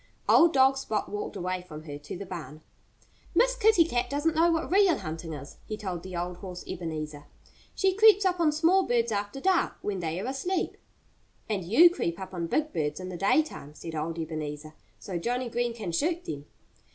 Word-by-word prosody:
Old 340 0 +6
dog 270 -1 +5
Spot 220 -6 -2
walked 205 0 -4
away 185 +1 -2
from 155 -4 -10
her, 145 -2 -7
to 145 +4 -7
the 200 - -6
barn. 155 -5 -8 0.7
"Miss - - +4
Kitty 435 -8 +5
Cat 245 -5 -1
doesn't 295 +3 0
know 335 +2 +4
what 325 0 -1
real 390 -2 +5
hunting 160 +1 -6
is," 140 -1 -9
he 215 - -4
told 185 -5 -4
the 185 0 -8
old 175 +1 -3
horse 180 -1 -8
Ebenezer. 155 -3 -5 0.5
"She 385 -1 +2
creeps 420 0 +6
up 360 -1 +1
on 320 -3 +4
small 330 +5 +4
birds 235 -8 +1
after 205 +4 -2
dark, 370 +4 +2
when 200 -2 -2
they 165 0 -2
are 200 - -4
asleep." 275 +9 -2 0.7
"And 205 -4 -2
you 295 - +7
creep 170 - -2
up 190 0 -7
on 170 -2 -3
big 305 - 0
birds 150 0 -1
in 185 0 -6
the 185 - -6
daytime," 195 - 0
said 165 0 -8
old 160 +2 -3
Ebenezer, 155 -1 -5 0.2
"so 180 -3 -5
Johnnie 245 +6 -2
Green 240 0 -1
can 205 -7 -4
shoot 330 - 0
them." 145 0 -6
200 Hz, 200 wpm, -28 LUFS, -, 0.7 s, you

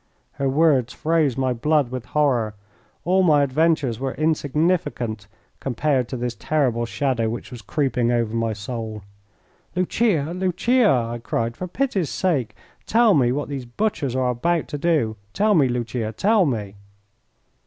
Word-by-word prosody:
Her 135 -1 -1
words 135 -4 +2
froze 155 -5 +1
my 130 -1 +1
blood 145 +1 +1
with 130 -2 -5
horror. 125 -7 +1 0.5
All 185 +2 +3
my 150 -5 +4
adventures 140 -4 +1
were 135 0 -3
insignificant 150 - 0 0.3
compared 135 0 0
to 130 - -4
this 120 0 -2
terrible 125 -5 0
shadow 120 -3 0
which 120 +3 -6
was 120 -2 -8
creeping 125 0 0
over 115 -2 0
my 115 -1 0
soul. 110 0 -6 0.7
"Lucia! 180 -4 +1
Lucia!" 200 +6 +2
I 120 -2 0
cried. 115 0 -2
"For 185 - -5
pity's 195 - -1
sake 140 - -1 0.3
tell 230 -1 +4
me 125 -6 +3
what 145 +3 -2
these 135 -3 -5
butchers 140 - -2
are 130 -1 +1
about 165 +7 0
to 145 - -4
do. 145 -9 +1 0.2
Tell 210 +1 +3
me, 150 -8 +4
Lucia! 120 -2 -2
Tell 205 - +3
me!" 105 -6 -3
135 Hz, 150 wpm, -22 LUFS, 120-165 Hz, 0.7 s, my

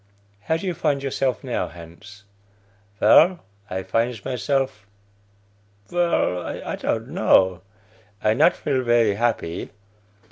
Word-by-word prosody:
(How 160 - +1
do 165 - -7
you 180 - -1
find 140 -3 -1
yourself 130 -4 -1
now, - - -2
Hans?) 85 +5 -13 0.8
Vell, 175 +2 +5 0.3
I 95 +1 -3
finds 115 +1 -1
myself 135 -4 -2 1.0
vell, 170 - +1
I - - -5
don't - - -2
know; 95 -2 +3 0.6
I 105 0 +2
not 155 +9 +4
feel 135 -3 -1
very 120 -3 +3
happy. 110 -6 -2
120 Hz, 115 wpm, -23 LUFS, 100-140 Hz, 1.0 s, Vell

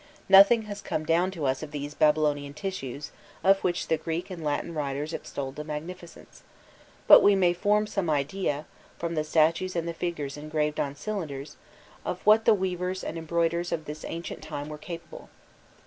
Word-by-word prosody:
* - - -27
Nothing 200 +4 +8
has 205 -1 -7
come 155 - -3
down 170 +3 +2
to 170 -6 -4
us 130 0 0
of 155 - -6
these 145 0 -5
Babylonian 150 -2 +2
tissues 150 -5 -5 0.3
of 195 +1 +5
which 175 -2 -1
the 160 - +2
Greek 165 +4 -4
and 170 -3 -6
Latin 150 +3 -2
writers 145 +1 -3
extolled 135 -1 -5
the 150 - -4
magnificence, 165 +3 -8 0.6
but - - +10
we 205 - +6
may 180 -2 +3
form 210 +4 +2
some 200 -5 -2
idea, 150 +1 -1 0.3
from 170 0 -3
the 155 -2 0
statues 160 +4 +2
and 170 -1 -1
the 170 - -2
figures 150 -5 -4
engraved 150 0 -2
on 140 0 -1
cylinders, 150 -6 -5 0.5
of - - -3
what 215 +1 +6
the 225 - +6
weavers 185 -1 -2
and 160 - -4
embroiderers 170 +1 -1
of 160 -2 -2
this 150 +1 -7
ancient 170 +1 -6
time 150 -1 -6
were 150 0 -7
capable. 170 +1 -9
165 Hz, 180 wpm, -27 LUFS, 150-185 Hz, 0.6 s, but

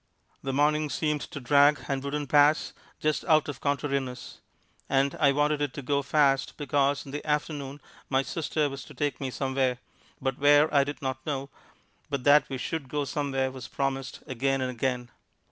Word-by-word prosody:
The 135 - -3
morning 150 +2 +2
seemed 150 0 -1
to - - -6
drag 140 +1 +4
and 135 -1 -2
wouldn't 145 0 -3
pass, 150 +2 +4 0.3
just 155 0 0
out 155 -3 +4
of 145 - -6
contrariness; 140 -3 -2 0.5
and 135 +1 +2
I 140 -2 +5
wanted 145 +1 +1
it 145 -3 -2
to 140 - -6
go 140 +2 +1
fast 140 -2 +2
because 140 0 +1
in 135 - -9
the 145 +1 -5
afternoon 145 -2 -2 0.3
my 135 0 +2
sister 155 0 -1
was 135 -2 -6
to - - -13
take 145 -2 -2
me 135 - -2
somewhere, 130 -1 0 0.4
but 135 -1 -2
where 145 +2 +5
I 140 -1 +5
did 140 -1 -6
not 130 0 -3
know, 140 -2 -4 0.6
but 140 -3 -2
that 145 +2 +5
we 135 - -3
should 140 0 -4
go 145 0 -1
somewhere 135 -2 -1
was 130 -2 -8
promised 135 -1 -3
again 135 0 0
and 130 -1 -1
again. 125 0 -2
140 Hz, 180 wpm, -27 LUFS, 135-145 Hz, 0.6 s, I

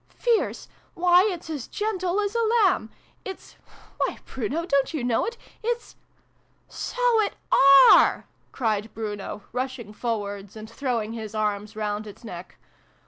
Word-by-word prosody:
" - - -39 0.2
Fierce! 465 -2 +1 0.3
Why, 360 +3 +5
it's 345 -2 -7
as 300 -6 -5
gentle 390 -3 -1
as 405 0 -2
a 465 - +1
lamb! 435 - +2 0.3
It's 380 -1 -9 0.4
why, - - 0
Bruno, 270 +8 -3
don't 280 -1 +1
you 280 - -2
know 240 -2 +1
it? 470 +1 -5 0.2
It's 475 +1 -3 0.4
" - - -40 0.2
So - - +2
it 415 - -1 0.6
are! - - +5
" - - -40
cried 220 -3 -1
Bruno, 205 -2 -5
rushing 250 -4 -4
forwards 205 -3 -4
and 215 0 -8
throwing 230 -2 -2
his 220 -2 -7
arms 210 0 -2
round 210 0 -3
its 210 +4 -12
neck. 180 -5 -9
245 Hz, 150 wpm, -25 LUFS, -, 0.6 s, Why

